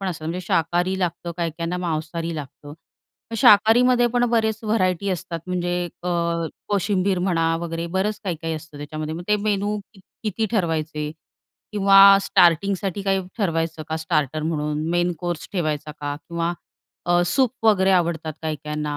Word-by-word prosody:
पण 195 Hz, -, -3 dB
असतात. 160 Hz, -3 st, -5 dB
म्हणजे 170 Hz, +3 st, -3 dB
शाकाहारी 175 Hz, +4 st, +1 dB
लागतं, 170 Hz, -1 st, -2 dB
काही 170 Hz, -2 st, -1 dB
काहींना 170 Hz, +1 st, -2 dB
मांसाहारी 165 Hz, -1 st, -3 dB
लागतं. 145 Hz, 0 st, -9 dB, 0.6 s
शाकाहारीमध्ये 240 Hz, +4 st, +6 dB
पण 245 Hz, +1 st, +1 dB
बरेच 220 Hz, -2 st, +1 dB
व्हरायटी 200 Hz, -3 st, +1 dB
असतात 170 Hz, -2 st, -4 dB
म्हणजे 175 Hz, -1 st, -1 dB, 0.3 s
अ, 180 Hz, -, -3 dB, 0.6 s
कोशिंबीर 200 Hz, -2 st, +1 dB
म्हणा 165 Hz, -3 st, +1 dB
वगैरे 165 Hz, 0 st, -4 dB
बरेच 205 Hz, +3 st, 0 dB
काही 180 Hz, -4 st, -2 dB
काही 165 Hz, 0 st, -2 dB
असतं 155 Hz, -1 st, -9 dB
त्याच्यामध्ये 155 Hz, +1 st, -5 dB
मग 170 Hz, -, -6 dB
ते 210 Hz, -, +4 dB
मेनू 205 Hz, 0 st, -1 dB, 0.2 s
की 195 Hz, -, -17 dB, 0.2 s
किती 220 Hz, +1 st, -1 dB
ठरवायचे 160 Hz, -7 st, -1 dB, 0.6 s
किंवा 195 Hz, -1 st, +8 dB
स्टार्टिंगसाठी 195 Hz, +2 st, +2 dB
काही 195 Hz, -1 st, +1 dB, 0.2 s
ठरवायचं 165 Hz, -5 st, -1 dB
का 160 Hz, -, -1 dB
स्टार्टर 155 Hz, -2 st, -1 dB
म्हणून 150 Hz, -2 st, -1 dB
मेन 175 Hz, +1 st, +1 dB
कोर्स 175 Hz, -2 st, -4 dB
ठेवायचा 155 Hz, -4 st, -2 dB
का 145 Hz, 0 st, -3 dB
किंवा 170 Hz, +2 st, -3 dB, 0.5 s
अ, 175 Hz, 0 st, +3 dB
सूप 255 Hz, +7 st, +2 dB, 0.2 s
वगैरे 195 Hz, -3 st, +4 dB
आवडतात 170 Hz, -3 st, +1 dB
काही 155 Hz, -1 st, -2 dB
काहींना 150 Hz, -1 st, -3 dB
175 Hz, 150 wpm, -23 LUFS, 160-195 Hz, 0.6 s, किंवा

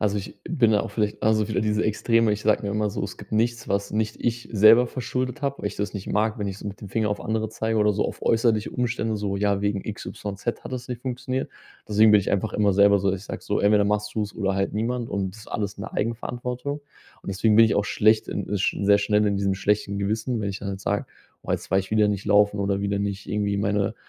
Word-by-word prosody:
also, 105 Hz, -1 st, +1 dB
ich 100 Hz, -, -6 dB
bin 125 Hz, -9 st, +3 dB
da 105 Hz, -, +4 dB
auch 115 Hz, -, -6 dB
vielleicht 105 Hz, -2 st, -1 dB
also, 110 Hz, -1 st, +2 dB
wieder 105 Hz, -, 0 dB
diese 105 Hz, 0 st, +1 dB
Extreme. 115 Hz, +1 st, +2 dB
Ich 105 Hz, 0 st, -1 dB
sage 110 Hz, 0 st, +2 dB
mir 100 Hz, -, -3 dB
immer 105 Hz, +1 st, 0 dB
so: -, -, -4 dB
„Es -, -, -5 dB
gibt -, -, -12 dB
nichts, 120 Hz, +2 st, 0 dB
was 100 Hz, 0 st, -1 dB
nicht 110 Hz, 0 st, -1 dB
ich 120 Hz, 0 st, -2 dB
selber 110 Hz, +4 st, +7 dB
verschuldet 130 Hz, +3 st, -3 dB
habe“, 140 Hz, 0 st, -1 dB
weil -, -, -4 dB
ich -, -, -3 dB
das 105 Hz, +1 st, -3 dB
nicht 100 Hz, -2 st, -6 dB
mag, 110 Hz, +2 st, 0 dB
wenn 100 Hz, -, -2 dB
ich 100 Hz, 0 st, -5 dB
so 105 Hz, -, -6 dB
mit 100 Hz, -, -9 dB
dem 100 Hz, -, -8 dB
Finger 110 Hz, +1 st, 0 dB
auf 105 Hz, -, -2 dB
andere 110 Hz, 0 st, -1 dB
zeige 110 Hz, 0 st, -1 dB
oder 105 Hz, 0 st, +3 dB
so 105 Hz, -, 0 dB
auf -, -, -7 dB
äußerliche 115 Hz, -2 st, +2 dB
Umstände, 115 Hz, -3 st, -1 dB
so: 100 Hz, -1 st, -2 dB
„Ja, 100 Hz, 0 st, +1 dB
wegen 100 Hz, -1 st, -1 dB
XYZ 105 Hz, +1 st, -5 dB
hat -, -, -7 dB
es 125 Hz, -1 st, -5 dB
nicht 125 Hz, -2 st, -5 dB
funktioniert.“ 130 Hz, 0 st, -3 dB, 0.4 s
Deswegen 105 Hz, +1 st, +5 dB
bin 105 Hz, -, +7 dB
ich -, -, -3 dB
einfach 100 Hz, +2 st, 0 dB
immer 105 Hz, -2 st, +2 dB
selber 100 Hz, 0 st, +5 dB
so, 95 Hz, 0 st, +1 dB
ich 95 Hz, +1 st, -5 dB
sage -, -, -7 dB
so: 105 Hz, -, -1 dB
„Entweder 105 Hz, 0 st, +4 dB
machst 105 Hz, +1 st, -1 dB
du's 105 Hz, -2 st, -2 dB
oder 100 Hz, -3 st, 0 dB
halt 95 Hz, 0 st, -1 dB
niemand 115 Hz, +2 st, -2 dB
und 95 Hz, -2 st, -2 dB
das 110 Hz, -, -12 dB
ist -, -, -13 dB
alles 100 Hz, -1 st, -3 dB
in -, -, -5 dB
Eigenverantwortung.“ 125 Hz, +5 st, -3 dB, 0.4 s
Und -, -, -10 dB
deswegen 105 Hz, +3 st, +2 dB
bin 115 Hz, -, +8 dB
ich 110 Hz, -, +2 dB
auch 100 Hz, -, +1 dB
schlecht 110 Hz, +1 st, +2 dB
in -, -, -4 dB
äh, 105 Hz, -, 0 dB
sch 95 Hz, -, 0 dB
sehr 100 Hz, 0 st, +5 dB
schnell 105 Hz, +1 st, +2 dB
in 100 Hz, -1 st, +1 dB
diesem 100 Hz, -1 st, 0 dB
schlechten 100 Hz, 0 st, 0 dB
Gewissen, 110 Hz, +4 st, -1 dB
wenn 100 Hz, -, -2 dB
ich 95 Hz, -, -5 dB
dann 100 Hz, 0 st, -4 dB
jetzt 95 Hz, 0 st, -7 dB
sage: -, -, -1 dB, 0.4 s
„Woa, -, -, 0 dB
jetzt -, -, -7 dB
war 95 Hz, -, +5 dB
ich 95 Hz, -, -9 dB
wieder 110 Hz, -1 st, +4 dB
nicht 100 Hz, -1 st, -2 dB
laufen“, 105 Hz, 0 st, +3 dB
oder 100 Hz, 0 st, 0 dB
wieder 100 Hz, 0 st, -1 dB
nicht 100 Hz, 0 st, -3 dB
irgendwie 100 Hz, -1 st, 0 dB
meine 100 Hz, 0 st, 0 dB
105 Hz, 260 wpm, -24 LUFS, 100-110 Hz, 0.4 s, bin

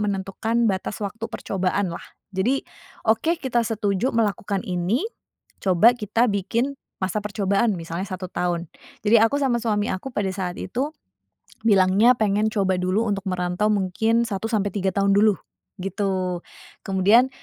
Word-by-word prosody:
menentukan 210 Hz, +3 st, 0 dB
batas 190 Hz, +2 st, -3 dB
waktu 220 Hz, +3 st, -4 dB
percobaan, 190 Hz, -3 st, -1 dB
lah. -, -, -7 dB, 0.3 s
Jadi, 235 Hz, +9 st, +1 dB, 0.5 s
oke, 320 Hz, +10 st, +3 dB
kita 240 Hz, -3 st, +1 dB
setuju 210 Hz, +2 st, 0 dB
melakukan 205 Hz, -3 st, 0 dB
ini, 180 Hz, -, 0 dB, 0.6 s
coba 195 Hz, +5 st, +5 dB
kita 225 Hz, +2 st, +1 dB
bikin 230 Hz, +8 st, -1 dB, 0.3 s
masa 195 Hz, +3 st, 0 dB
percobaan, 200 Hz, +1 st, +1 dB
misalnya 170 Hz, +2 st, -4 dB
1 185 Hz, 0 st, -5 dB
tahun. 175 Hz, -1 st, -1 dB, 0.4 s
Jadi 215 Hz, +2 st, +6 dB
aku 225 Hz, +6 st, +3 dB
sama 260 Hz, -4 st, +2 dB
suami 210 Hz, -2 st, 0 dB
aku 185 Hz, +8 st, -4 dB
pada 195 Hz, -2 st, 0 dB
saat 180 Hz, -2 st, -4 dB
itu 255 Hz, +9 st, -2 dB, 0.8 s
bilangnya 205 Hz, +3 st, +5 dB
pengen 210 Hz, 0 st, +2 dB
coba 195 Hz, -4 st, +1 dB
dulu 190 Hz, +5 st, +1 dB
untuk 200 Hz, -2 st, -1 dB
merantau 180 Hz, +3 st, 0 dB
mungkin 220 Hz, +4 st, +1 dB
1 220 Hz, -1 st, -3 dB
sampai 205 Hz, -3 st, +1 dB
3 195 Hz, -2 st, 0 dB
tahun 200 Hz, 0 st, +3 dB
dulu, 205 Hz, -2 st, +4 dB, 0.4 s
gitu. 185 Hz, -2 st, -1 dB, 0.4 s
Kemudian, 205 Hz, +7 st, +4 dB
200 Hz, 140 wpm, -23 LUFS, 190-225 Hz, 0.8 s, Jadi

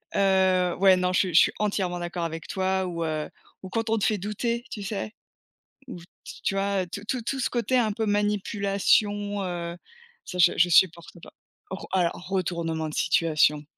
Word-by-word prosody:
heu, 190 Hz, -2 st, +3 dB
ouais. 190 Hz, -1 st, +6 dB
Non, 180 Hz, 0 st, 0 dB
je -, -, +3 dB
suis 185 Hz, -3 st, 0 dB
je -, -, +9 dB
suis -, -, +3 dB
entièrement 190 Hz, -4 st, -1 dB
d'accord 175 Hz, 0 st, -4 dB
avec 165 Hz, -1 st, -6 dB
toi 190 Hz, -1 st, -1 dB
ou 170 Hz, -2 st, -3 dB
heu, 155 Hz, -1 st, -3 dB, 0.3 s
ou 190 Hz, -, -7 dB
quand 225 Hz, +3 st, -2 dB
on 225 Hz, -, +2 dB
te 210 Hz, -, 0 dB
fait 215 Hz, -, +1 dB
douter, 230 Hz, +4 st, -3 dB
tu 205 Hz, -, -6 dB
sais? 205 Hz, +2 st, -4 dB, 0.8 s
Ou 180 Hz, -, -7 dB
t 170 Hz, -, -15 dB, 0.4 s
tu -, -, 0 dB
vois? 195 Hz, -1 st, 0 dB
Tout 200 Hz, +4 st, -8 dB
tout 255 Hz, -3 st, -1 dB
tout 265 Hz, +4 st, -3 dB
ce -, -, 0 dB
côté 250 Hz, +1 st, +1 dB
un 220 Hz, -3 st, +1 dB
peu 220 Hz, +1 st, -2 dB
manipulation, 205 Hz, 0 st, +1 dB
heu, 170 Hz, -1 st, -4 dB, 0.5 s
ça 180 Hz, -, -7 dB
je 175 Hz, 0 st, +6 dB
je 175 Hz, -, +4 dB
supporte 170 Hz, -1 st, +3 dB
pas. -, -, -13 dB, 0.4 s
Re 190 Hz, -, -6 dB
alors 175 Hz, -3 st, +2 dB, 0.2 s
retournement 170 Hz, -4 st, -2 dB
de 150 Hz, -, -7 dB
situation, 150 Hz, -2 st, +2 dB
190 Hz, 190 wpm, -26 LUFS, 175-205 Hz, 0.8 s, je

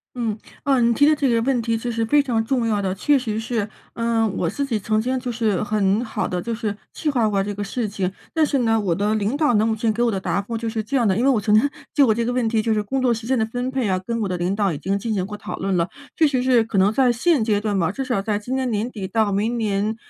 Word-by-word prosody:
嗯， 225 Hz, -4 st, -2 dB, 0.3 s
嗯， 260 Hz, -5 st, +3 dB
你 -, -, +3 dB
提 285 Hz, -, +4 dB
的 310 Hz, -, +5 dB
这 280 Hz, -3 st, +1 dB
个 230 Hz, -1 st, +2 dB
问 255 Hz, -1 st, +1 dB
题 230 Hz, 0 st, 0 dB
就 240 Hz, +2 st, -3 dB
是 230 Hz, 0 st, -1 dB
非 290 Hz, +5 st, +3 dB
常 235 Hz, -5 st, 0 dB
重 245 Hz, 0 st, 0 dB
要 210 Hz, -2 st, +1 dB
的， 190 Hz, -1 st, -1 dB
确 290 Hz, +8 st, +3 dB
实 220 Hz, -4 st, -3 dB
是。 225 Hz, -2 st, -2 dB, 0.2 s
呃， 230 Hz, -1 st, +1 dB
我 185 Hz, -4 st, -1 dB
自 280 Hz, +10 st, -2 dB
己 235 Hz, -6 st, -1 dB
曾 215 Hz, +2 st, 0 dB
经 255 Hz, +3 st, -1 dB
就 250 Hz, -1 st, -4 dB
是 220 Hz, -5 st, 0 dB
很 205 Hz, +1 st, +1 dB
好 220 Hz, -, -2 dB
的， 180 Hz, -1 st, -2 dB
就 235 Hz, -, -3 dB
是 215 Hz, -3 st, -3 dB, 0.2 s
计 310 Hz, -, -2 dB
划 245 Hz, -6 st, +2 dB
过 200 Hz, -2 st, +1 dB
这 205 Hz, +1 st, -3 dB
个 205 Hz, +1 st, -4 dB
事 220 Hz, +3 st, -2 dB
情， 195 Hz, -2 st, -2 dB, 0.2 s
但 320 Hz, -1 st, +3 dB
是 285 Hz, -2 st, 0 dB
呢， 225 Hz, -2 st, +2 dB
我 185 Hz, -5 st, 0 dB
的 205 Hz, +3 st, 0 dB
领 215 Hz, +4 st, 0 dB
导 295 Hz, -4 st, +2 dB
呢， 210 Hz, +1 st, +3 dB
目 225 Hz, -1 st, +1 dB
前 220 Hz, 0 st, 0 dB
给 225 Hz, +2 st, -2 dB
我 235 Hz, -, +2 dB
的 195 Hz, -, -2 dB
答 190 Hz, -, -1 dB
复 230 Hz, +3 st, -5 dB
就 230 Hz, 0 st, -3 dB
是 220 Hz, -1 st, -3 dB
这 250 Hz, +6 st, -4 dB
样 240 Hz, -3 st, +2 dB
的， 190 Hz, -1 st, +2 dB
因 235 Hz, -, +1 dB
为 275 Hz, -, +4 dB
我 250 Hz, -5 st, +3 dB
曾 210 Hz, +1 st, +1 dB
经 220 Hz, +6 st, +5 dB, 0.3 s
就 285 Hz, -, +5 dB
我 220 Hz, -, +4 dB
这 235 Hz, +2 st, -1 dB
个 245 Hz, -, 0 dB
问 245 Hz, -2 st, 0 dB
题， 225 Hz, -1 st, +1 dB
就 225 Hz, 0 st, +1 dB
是 210 Hz, -, +1 dB
工 265 Hz, +6 st, -2 dB
作 255 Hz, -1 st, +3 dB
时 225 Hz, 0 st, -6 dB
间 260 Hz, +1 st, +2 dB
的 220 Hz, -, +2 dB
分 245 Hz, +2 st, -3 dB
配 260 Hz, -4 st, -1 dB
啊， 185 Hz, -1 st, +1 dB
跟 230 Hz, +5 st, -3 dB
我 205 Hz, -, 0 dB
的 180 Hz, -1 st, -2 dB
领 175 Hz, +3 st, -1 dB
导 200 Hz, -2 st, +1 dB
已 -, -, -4 dB
经 195 Hz, +6 st, -1 dB
进 225 Hz, +2 st, -2 dB
行 190 Hz, -3 st, -1 dB
过 210 Hz, +2 st, -7 dB
讨 205 Hz, -, -6 dB
论 195 Hz, 0 st, -1 dB
了， 170 Hz, +1 st, 0 dB, 0.3 s
确 315 Hz, -, +4 dB
实 265 Hz, -3 st, 0 dB
是 250 Hz, -3 st, +4 dB
可 225 Hz, -2 st, -4 dB
能 195 Hz, +2 st, +4 dB
在 255 Hz, 0 st, +4 dB
现 265 Hz, +2 st, +2 dB
阶 215 Hz, -2 st, +1 dB
段 205 Hz, -2 st, -1 dB
吧， 170 Hz, -2 st, +1 dB
至 270 Hz, +7 st, -4 dB
少 245 Hz, -6 st, 0 dB
在 210 Hz, 0 st, -1 dB
今 245 Hz, +5 st, -4 dB
年 260 Hz, -1 st, -1 dB
年 220 Hz, +1 st, -1 dB
底 200 Hz, -5 st, -5 dB
到 215 Hz, +1 st, +1 dB
明 215 Hz, +5 st, 0 dB
年 210 Hz, -1 st, 0 dB
225 Hz, 335 characters per minute, -22 LUFS, 205-245 Hz, 0.3 s, 的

